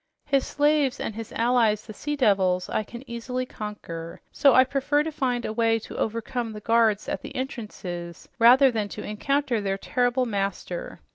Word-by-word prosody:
His 275 Hz, -2 st, +1 dB
slaves 290 Hz, -2 st, +2 dB
and -, -, -3 dB
his 225 Hz, +1 st, -7 dB
allies, 230 Hz, -3 st, +2 dB
the 215 Hz, -, -9 dB
sea 295 Hz, +7 st, -3 dB
devils, 190 Hz, -8 st, +2 dB
I -, -, 0 dB
can 235 Hz, +5 st, -10 dB
easily 250 Hz, +2 st, -3 dB
conquer, 170 Hz, -8 st, -7 dB
so 275 Hz, -3 st, +4 dB
I 260 Hz, -, +8 dB
prefer 280 Hz, +3 st, +1 dB
to 320 Hz, -, -3 dB
find 250 Hz, -5 st, -1 dB
a 215 Hz, -, -3 dB
way 225 Hz, 0 st, +2 dB
to 225 Hz, -, -9 dB
overcome 230 Hz, +1 st, -2 dB
the 210 Hz, -, -7 dB
guards 225 Hz, -1 st, +2 dB
at -, -, -3 dB
the -, -, -9 dB
entrances 185 Hz, -, -6 dB
rather 255 Hz, +3 st, +7 dB
than 215 Hz, -3 st, -2 dB
to -, -, -5 dB
encounter 260 Hz, +2 st, 0 dB
their 195 Hz, -1 st, -1 dB
terrible 245 Hz, +4 st, +1 dB
master. 195 Hz, -5 st, -4 dB
230 Hz, 180 wpm, -25 LUFS, 210-260 Hz, -, I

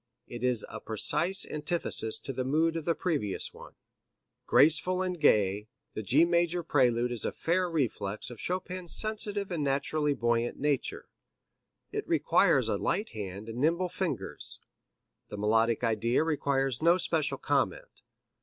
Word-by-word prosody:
It 120 Hz, 0 st, -8 dB
is 125 Hz, -4 st, +1 dB
a -, -, -8 dB
precise 160 Hz, -, 0 dB
antithesis 150 Hz, -7 st, -1 dB
to 135 Hz, -, -5 dB
the 130 Hz, -, -2 dB
mood 160 Hz, +5 st, +1 dB
of 165 Hz, -2 st, -4 dB
the 170 Hz, -, +1 dB
previous 145 Hz, -, -2 dB
one. -, -, -13 dB, 0.7 s
Graceful 180 Hz, +5 st, +5 dB
and 180 Hz, -2 st, -3 dB
gay, 105 Hz, -7 st, +3 dB, 0.3 s
the -, -, -4 dB
G 135 Hz, -, +4 dB
major 170 Hz, 0 st, +1 dB
prelude 125 Hz, -5 st, +2 dB
is 120 Hz, -3 st, -2 dB
a -, -, -1 dB
fair 180 Hz, +2 st, 0 dB
reflex 115 Hz, -7 st, -2 dB
of 120 Hz, -, -10 dB
Chopin's 180 Hz, -1 st, -2 dB
sensitive 205 Hz, -2 st, 0 dB
and 165 Hz, -4 st, -2 dB
naturally 145 Hz, +1 st, 0 dB
buoyant 120 Hz, 0 st, 0 dB
nature. 145 Hz, -2 st, -1 dB, 0.8 s
It -, -, -4 dB
requires -, -, +3 dB
a -, -, 0 dB
light 210 Hz, +2 st, -1 dB
hand 100 Hz, -1 st, -7 dB
and 115 Hz, +2 st, -6 dB
nimble 170 Hz, +5 st, +1 dB
fingers. 165 Hz, -, -4 dB, 0.7 s
The 105 Hz, -, -7 dB
melodic 110 Hz, +3 st, +1 dB
idea 115 Hz, +4 st, +1 dB
requires 140 Hz, -4 st, 0 dB
no 170 Hz, +2 st, +5 dB
special 160 Hz, -6 st, -1 dB
comment. 135 Hz, -10 st, -2 dB
145 Hz, 145 wpm, -29 LUFS, 115-170 Hz, 0.8 s, Graceful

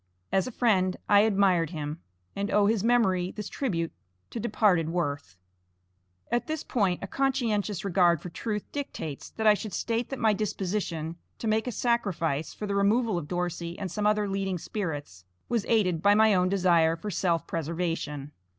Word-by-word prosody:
As 195 Hz, +3 st, +2 dB
a -, -, -4 dB
friend 190 Hz, -7 st, +2 dB
I 205 Hz, -1 st, +6 dB
admired 195 Hz, -6 st, +3 dB
him, 155 Hz, -1 st, -5 dB, 0.4 s
and 200 Hz, +1 st, -2 dB
owe 210 Hz, -1 st, +4 dB
his 210 Hz, -1 st, +2 dB
memory 195 Hz, -7 st, +3 dB
this 210 Hz, +1 st, -6 dB
tribute 170 Hz, -, -2 dB, 0.4 s
to 235 Hz, -, -4 dB
departed 200 Hz, -8 st, +2 dB
worth. 145 Hz, -, -3 dB, 0.9 s
At 240 Hz, +4 st, 0 dB
this 315 Hz, -1 st, -3 dB
point 195 Hz, -7 st, 0 dB
a -, -, -3 dB
conscientious 225 Hz, -7 st, 0 dB
regard 175 Hz, -3 st, +3 dB
for 180 Hz, -, -8 dB
truth 210 Hz, +3 st, -3 dB
dictates 160 Hz, -, -5 dB
that 220 Hz, -, -4 dB
I 215 Hz, -, +8 dB
should 210 Hz, 0 st, -5 dB
state 230 Hz, +1 st, -1 dB
that 270 Hz, -, -4 dB
my 220 Hz, -3 st, +3 dB
disposition 185 Hz, -5 st, -2 dB, 0.2 s
to 230 Hz, -, -4 dB
make 220 Hz, +2 st, +1 dB
a -, -, -1 dB
sacrifice 175 Hz, -, 0 dB
for 210 Hz, -, -6 dB
the 200 Hz, -, -2 dB
removal 210 Hz, +2 st, +2 dB
of 150 Hz, -, -8 dB
Dorsey 175 Hz, 0 st, -3 dB
and 190 Hz, -4 st, -4 dB
some 210 Hz, +2 st, 0 dB
other 210 Hz, -1 st, +2 dB
leading 195 Hz, -1 st, -1 dB
spirits 145 Hz, -, -5 dB, 0.3 s
was 235 Hz, -4 st, 0 dB
aided 185 Hz, -8 st, +2 dB
by 205 Hz, +2 st, +5 dB
my 220 Hz, 0 st, +5 dB
own 180 Hz, -1 st, +3 dB
desire 175 Hz, -4 st, +3 dB
for 205 Hz, +5 st, -6 dB
_self 170 Hz, -2 st, 0 dB
preservation. 160 Hz, -3 st, -3 dB
195 Hz, 175 wpm, -28 LUFS, 170-215 Hz, 0.9 s, I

